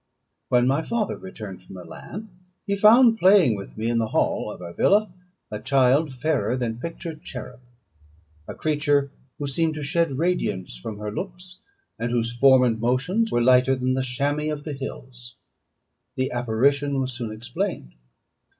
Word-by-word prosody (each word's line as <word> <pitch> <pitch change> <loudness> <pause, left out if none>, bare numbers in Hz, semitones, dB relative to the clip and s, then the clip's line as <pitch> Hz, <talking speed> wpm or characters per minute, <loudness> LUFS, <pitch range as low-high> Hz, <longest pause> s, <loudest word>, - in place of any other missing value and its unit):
When 125 0 +4
my 135 +4 +2
father 215 +3 -2
returned 105 - -9
from 95 - -13
Milan, 170 - -9 0.3
he 200 - 0
found 225 +3 +6
playing 185 - +6
with 100 +1 -9
me 110 +1 -2
in 115 0 +1
the 110 - 0
hall - - 0
of - - -10
our 85 -1 -8
villa, 205 - +2 0.4
a 105 - -4
child 135 +4 +3
fairer 130 -3 -1
than 120 -2 -3
pictured 165 +1 -6
cherub 125 -1 -8 0.9
a - - -7
creature 145 -2 +1 0.3
who 145 - -4
seemed 155 +3 0
to 150 - -5
shed 160 -2 0
radiance 140 - -1
from 100 - -7
her 105 0 -5
looks, 180 - -7 0.4
and 115 +1 -1
whose 120 0 -1
form 130 +1 +6
and 115 -3 +1
motions 135 - 0
were 120 - +2
lighter 130 +2 +4
than 130 0 0
the 130 - 0
chamois 145 +4 -1
of 145 -1 -5
the 150 - -5
hills. 125 -3 -8 0.8
The 130 0 -1
apparition 135 +4 +1
was 130 -1 -2
soon 120 -2 -5
explained. 120 - -4
130 Hz, 165 wpm, -24 LUFS, 120-160 Hz, 0.9 s, found